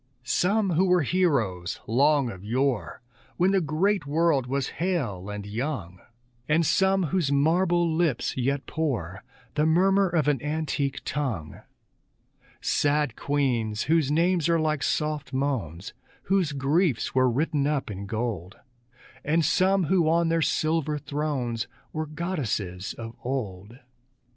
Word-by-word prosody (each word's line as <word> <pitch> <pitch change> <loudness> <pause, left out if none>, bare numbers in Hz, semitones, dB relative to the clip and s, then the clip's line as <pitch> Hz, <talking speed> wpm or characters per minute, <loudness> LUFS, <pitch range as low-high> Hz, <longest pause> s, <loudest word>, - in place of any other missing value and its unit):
Some 185 - +1
who 175 +3 +3
were 180 -2 +4
heroes 120 - 0
long 140 +2 +3
of 95 -2 -10
yore, 125 +2 -1 0.3
When 185 +2 +3
the 195 -1 +3
great 175 +4 0
world 150 -3 +2
was 135 +1 -1
hale 120 - -1
and 105 -1 -5
young; 105 - -4 0.5
And 160 +2 +3
some 190 +4 +3
whose 165 -5 0
marble 170 +4 +3
lips 160 -5 0
yet 135 +2 -1
pour 115 - -3 0.3
The 150 +1 +2
murmur 190 +4 +3
of 160 -4 +1
an 140 -5 +2
antique 150 -2 -2
tongue; 115 - -3 1.0
Sad 145 -4 +1
queens, 120 -7 0
whose 160 -3 +2
names 170 +2 +2
are 165 -1 +3
like 155 -2 0
soft 150 -3 -1
moans, 115 - -2 0.3
Whose 190 -5 +1
griefs 140 - +1
were 130 -1 +4
written 140 +2 0
up 145 -7 -1
in 100 0 -6
gold; 110 -4 -3 0.7
And 160 +2 +2
some 190 +4 +3
who 170 -1 +2
on 165 0 +2
their 165 0 +2
silver 155 -1 0
thrones 140 -6 -2 0.3
Were 155 0 -3
goddesses 130 - -3
of 115 -1 -7
old. 110 -4 -4
145 Hz, 135 wpm, -26 LUFS, 120-165 Hz, 1.0 s, were